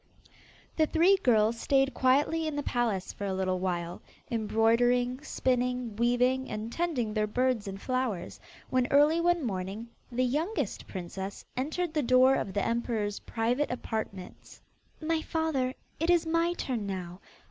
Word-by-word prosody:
The 315 Hz, -1 st, +4 dB
three 345 Hz, +5 st, +5 dB
girls 230 Hz, -, +3 dB
stayed 270 Hz, +1 st, +2 dB
quietly 290 Hz, +5 st, +2 dB
in 310 Hz, -, -3 dB
the 290 Hz, -, -2 dB
palace 230 Hz, -8 st, -1 dB
for 200 Hz, -, -4 dB
a 190 Hz, -, -1 dB
little 185 Hz, -1 st, 0 dB
while, 175 Hz, -2 st, -3 dB, 0.3 s
embroidering, 240 Hz, +3 st, +2 dB
spinning, 250 Hz, -5 st, -1 dB
weaving, 250 Hz, +3 st, +2 dB
and 215 Hz, +2 st, -4 dB
tending 280 Hz, -11 st, -1 dB
their 215 Hz, -1 st, +1 dB
birds 245 Hz, -1 st, 0 dB
and 195 Hz, 0 st, -6 dB
flowers, 255 Hz, -6 st, -2 dB, 0.3 s
when 255 Hz, -1 st, +2 dB
early 295 Hz, +4 st, +4 dB
one 345 Hz, -3 st, +2 dB
morning, 195 Hz, +2 st, -4 dB, 0.2 s
the 255 Hz, +1 st, +1 dB
youngest 295 Hz, -, -2 dB
princess 190 Hz, +2 st, -6 dB
entered 310 Hz, +6 st, -2 dB
the 305 Hz, -, +1 dB
door 255 Hz, +1 st, +5 dB
of 205 Hz, -, -1 dB
the 200 Hz, -, 0 dB
emperor's 230 Hz, -3 st, -1 dB
private 240 Hz, +6 st, -1 dB
apartments. 220 Hz, -6 st, -6 dB, 0.4 s
'My 320 Hz, 0 st, 0 dB
father, 315 Hz, -6 st, -1 dB, 0.3 s
it 330 Hz, +2 st, 0 dB
is 345 Hz, -1 st, +4 dB
my 335 Hz, +1 st, +1 dB
turn 240 Hz, -11 st, -3 dB
now. 180 Hz, -2 st, -5 dB
245 Hz, 145 wpm, -29 LUFS, 215-290 Hz, 0.4 s, three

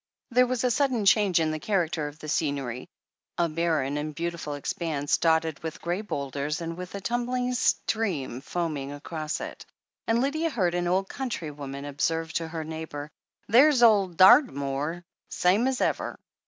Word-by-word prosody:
There 250 Hz, +1 st, +5 dB
was 255 Hz, -1 st, -1 dB
a 250 Hz, -, +2 dB
sudden 250 Hz, -5 st, +1 dB
change 195 Hz, -3 st, +4 dB
in 160 Hz, -1 st, +1 dB
the 155 Hz, -, -3 dB
character 165 Hz, -5 st, 0 dB
of 145 Hz, +1 st, -10 dB
the 155 Hz, -, -9 dB
scenery 140 Hz, -5 st, -2 dB, 0.2 s
— -, -, -62 dB
3. 170 Hz, -1 st, +2 dB
barren 155 Hz, -4 st, 0 dB
and 150 Hz, 0 st, -4 dB
beautiful 170 Hz, -2 st, -3 dB
expanse, 145 Hz, 0 st, -1 dB
dotted 160 Hz, -2 st, +1 dB
with 160 Hz, -1 st, -5 dB
grey 175 Hz, +4 st, -2 dB
boulders 145 Hz, -5 st, -3 dB
and 165 Hz, 0 st, -4 dB
with 180 Hz, +2 st, -7 dB
a 200 Hz, -, -5 dB
tiunbling 245 Hz, +3 st, -1 dB
stream 185 Hz, -, 0 dB
foaming 150 Hz, -3 st, -3 dB
across 155 Hz, +2 st, -4 dB
it -, -, -7 dB, 0.2 s
— -, -, -53 dB
^and 225 Hz, +1 st, +3 dB
Lydia 310 Hz, +6 st, 0 dB
heard 185 Hz, -, 0 dB
an 175 Hz, 0 st, 0 dB
old 190 Hz, +2 st, +1 dB
cotmtry 200 Hz, -, -4 dB
woman 140 Hz, -1 st, -6 dB
observe 160 Hz, +4 st, -1 dB
to 165 Hz, -, -1 dB
her 160 Hz, 0 st, -5 dB
neighbour: 155 Hz, -2 st, -6 dB, 0.4 s
"There's 255 Hz, +3 st, +6 dB
ole 210 Hz, -4 st, +6 dB
Dartymoor, 170 Hz, -, +4 dB, 0.3 s
same 200 Hz, +8 st, +2 dB
as 265 Hz, -1 st, 0 dB
ever." -, -, -1 dB
165 Hz, 170 wpm, -27 LUFS, 150-215 Hz, 0.4 s, There's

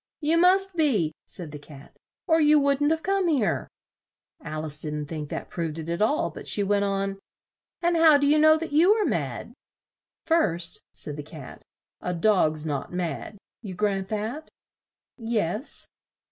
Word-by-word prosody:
"You 320 Hz, +2 st, +2 dB
must 380 Hz, +1 st, +4 dB
be," 225 Hz, -, +1 dB
said 170 Hz, -5 st, -8 dB
the 150 Hz, -, -8 dB
Cat, 145 Hz, -1 st, -14 dB, 0.3 s
"or 320 Hz, -1 st, +3 dB
you 300 Hz, 0 st, +6 dB
wouldn't 280 Hz, +1 st, +2 dB
have 320 Hz, 0 st, 0 dB
come 390 Hz, -1 st, +1 dB
here." 245 Hz, -, +1 dB, 0.8 s
Al 155 Hz, +1 st, -4 dB
ice 150 Hz, -1 st, -3 dB
didn't 150 Hz, -1 st, -4 dB
think 150 Hz, -1 st, -6 dB
that -, -, -5 dB
proved 165 Hz, -2 st, -3 dB
it 160 Hz, 0 st, -6 dB
at 170 Hz, +3 st, -2 dB
all, 255 Hz, +8 st, +1 dB
but -, -, -10 dB
she 205 Hz, -, +3 dB
went 200 Hz, 0 st, +1 dB
on; 195 Hz, 0 st, -2 dB, 0.6 s
"and 345 Hz, 0 st, +2 dB
how 320 Hz, -3 st, +7 dB
do 285 Hz, -, +1 dB
you 300 Hz, +2 st, +4 dB
know 310 Hz, +1 st, +6 dB
that 330 Hz, -1 st, -5 dB
you 335 Hz, +7 st, +5 dB
are 430 Hz, -2 st, 0 dB
mad?" -, -, -3 dB, 0.7 s
"First," 175 Hz, -, +1 dB
said 150 Hz, 0 st, -5 dB
the -, -, -4 dB
Cat, 145 Hz, -2 st, -11 dB, 0.4 s
"a 180 Hz, -, -3 dB
dog's 165 Hz, -5 st, +2 dB
not 145 Hz, -3 st, -3 dB
mad. 175 Hz, +3 st, -4 dB, 0.2 s
You 195 Hz, -5 st, -7 dB
grant 195 Hz, -1 st, -1 dB
that?" 220 Hz, +9 st, -4 dB, 0.7 s
"Yes." 225 Hz, -, -2 dB
205 Hz, 170 wpm, -26 LUFS, -, 0.8 s, how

